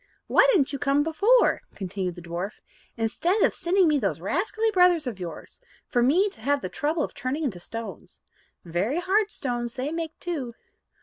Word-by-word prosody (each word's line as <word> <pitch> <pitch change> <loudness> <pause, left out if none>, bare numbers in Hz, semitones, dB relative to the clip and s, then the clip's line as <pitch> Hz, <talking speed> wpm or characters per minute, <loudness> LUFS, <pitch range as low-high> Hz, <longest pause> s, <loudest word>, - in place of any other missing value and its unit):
"Why - - +5
didn't 305 - +2
you 280 - -3
come 280 +2 +2
before," 405 +11 +3
continued 185 -2 -4
the 175 - -10
dwarf, 175 +4 -5 0.4
"instead 335 - +1
of - - +3
sending 365 +1 +2
me 300 -2 +3
those - - -1
rascally 445 0 0
brothers 360 -5 +4
of 230 -6 -5
yours, 175 - -8 0.2
for 245 - 0
me 325 +12 +4
to 225 - -15
have 285 +4 +1
the - - -4
trouble 305 +1 -1
of - - -5
turning 270 +5 -3
into 220 -11 -2
stones? 225 +5 -8 0.5
Very 190 - -1
hard 400 +3 +2
stones 240 - -3
they 270 +3 -3
make 325 -1 -4
too." 280 -10 -4
285 Hz, 180 wpm, -26 LUFS, 230-350 Hz, 0.5 s, Why